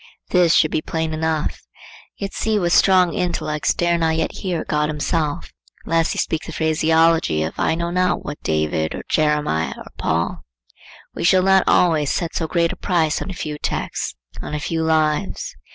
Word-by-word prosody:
This 180 -3 +4
should 155 - +4
be 155 - 0
plain 160 0 -3
enough. 160 -1 -1 0.6
Yet 200 -1 -5
see 220 -1 0
what 175 -4 0
strong 185 -1 +4
intellects 170 -6 -1
dare 175 0 +1
not 160 -1 +1
yet 160 0 -1
hear 180 -4 -3
God 150 0 0
himself 150 - -2 0.3
unless 165 0 +1
he - - -7
speak 160 +1 -1
the - - -6
phraseology 160 - +2
of 80 - -3
I - - +2
know 170 +1 -2
not 180 0 0
what 150 - -6
David, 80 0 -1
or - - -7
Jeremiah, 150 - +1
or - - -11
Paul. 80 +1 -1 0.7
We - - -5
shall 185 +2 +4
not 190 0 +4
always 155 -5 +3
set 170 -2 -2
so 165 - -2
great 170 0 +1
a - - -6
price 165 -5 0
on - - -5
a - - -4
few 150 -4 -5
texts, - - -3 0.3
on - - -5
a - - -2
few 160 +2 -2
lives. 160 - 0
160 Hz, 185 wpm, -21 LUFS, 150-175 Hz, 0.7 s, This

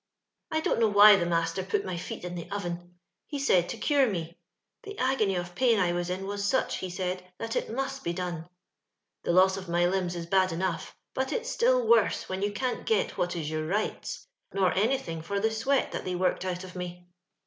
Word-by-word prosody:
I 315 0 0
don't - - +1
know 225 - +5
why 205 0 +9
the 175 -3 0
master 165 +1 0
put 190 - -1
my 185 -2 -3
feet 170 - -6
in 180 0 -5
the 170 -2 -6
oven; 175 -3 -5 0.3
he 290 - -4
said 185 -11 +3
to 235 - -4
cure 275 +2 +3
me: 170 -3 -4 0.5
the 410 0 -9
agony 255 -7 +1
of 175 0 -4
pain 235 +2 +3
I 175 -2 +2
was 175 0 -2
in 185 +1 -3
was 200 +1 -3
sach, 260 +6 +1
he 185 - -4
said, 180 0 -4
that 225 0 -4
it - - -1
must 270 +3 -3
be 170 - -1
done. 175 -2 -4 0.7
The - - 0
loss 190 +2 +5
of 190 -2 -7
my 175 +1 +2
limbs 180 -1 0
is 170 -1 -4
bad 185 +1 +3
enough, 170 0 -3 0.2
but 265 0 -1
it's 485 0 -2
still - - +3
worse 465 - +3
when 190 +1 -3
you 205 +1 0
cant 250 +4 -3
get 220 -3 +1
what 175 0 -1
is 155 -2 -3
your 155 0 -2
rights, 215 - -2 0.3
nor 190 -3 +2
anything 195 -6 0
for 200 +5 -2
the 220 +2 +1
sweat 265 +5 +1
that - - -4
they 180 - -2
worked 185 +1 0
out 180 0 -3
of 185 0 -10
me. 180 0 -6
185 Hz, 220 wpm, -28 LUFS, 175-225 Hz, 0.7 s, why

